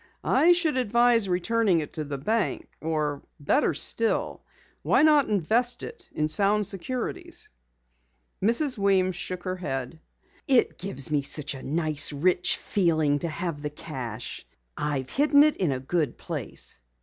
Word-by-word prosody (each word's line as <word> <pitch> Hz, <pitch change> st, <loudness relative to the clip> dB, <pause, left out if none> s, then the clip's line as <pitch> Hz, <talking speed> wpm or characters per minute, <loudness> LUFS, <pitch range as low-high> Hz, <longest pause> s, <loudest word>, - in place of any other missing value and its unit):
"I 350 Hz, +2 st, +4 dB
should 330 Hz, -5 st, +1 dB
advise 235 Hz, -3 st, +3 dB
returning 185 Hz, +1 st, +1 dB
it 150 Hz, -, -6 dB
to 155 Hz, -, -4 dB
the 140 Hz, -1 st, -5 dB
bank, 190 Hz, +2 st, -1 dB
or 155 Hz, -3 st, -2 dB, 0.2 s
better 145 Hz, +1 st, +1 dB
still, 225 Hz, +8 st, +1 dB, 0.4 s
why -, -, +3 dB
not 300 Hz, -3 st, +4 dB
invest 220 Hz, +6 st, +1 dB
it 470 Hz, -, -10 dB
in 155 Hz, -, -1 dB
sound 205 Hz, +5 st, +2 dB
securities?" 200 Hz, +6 st, -4 dB, 0.9 s
Mrs. 240 Hz, +4 st, +2 dB
Weems 190 Hz, -2 st, +2 dB
shook 180 Hz, 0 st, -5 dB
her 185 Hz, 0 st, -3 dB
head. 135 Hz, -3 st, -5 dB, 0.5 s
"It 260 Hz, -4 st, +2 dB
gives 180 Hz, -8 st, -3 dB
me 145 Hz, -2 st, +1 dB, 0.3 s
a 135 Hz, -, -9 dB
nice 155 Hz, -1 st, +1 dB
rich 175 Hz, +5 st, +1 dB
feeling 160 Hz, -6 st, +1 dB
to 170 Hz, -, -3 dB
have 165 Hz, -2 st, -4 dB
the 150 Hz, -, -3 dB
cash. 130 Hz, -7 st, -7 dB, 0.3 s
I've 140 Hz, -3 st, -3 dB
hidden 290 Hz, 0 st, +5 dB
it 305 Hz, 0 st, +2 dB
in 175 Hz, -6 st, 0 dB
a 130 Hz, -, -2 dB
good 145 Hz, 0 st, -2 dB
place." -, -, -6 dB
180 Hz, 145 wpm, -26 LUFS, 150-230 Hz, 0.9 s, hidden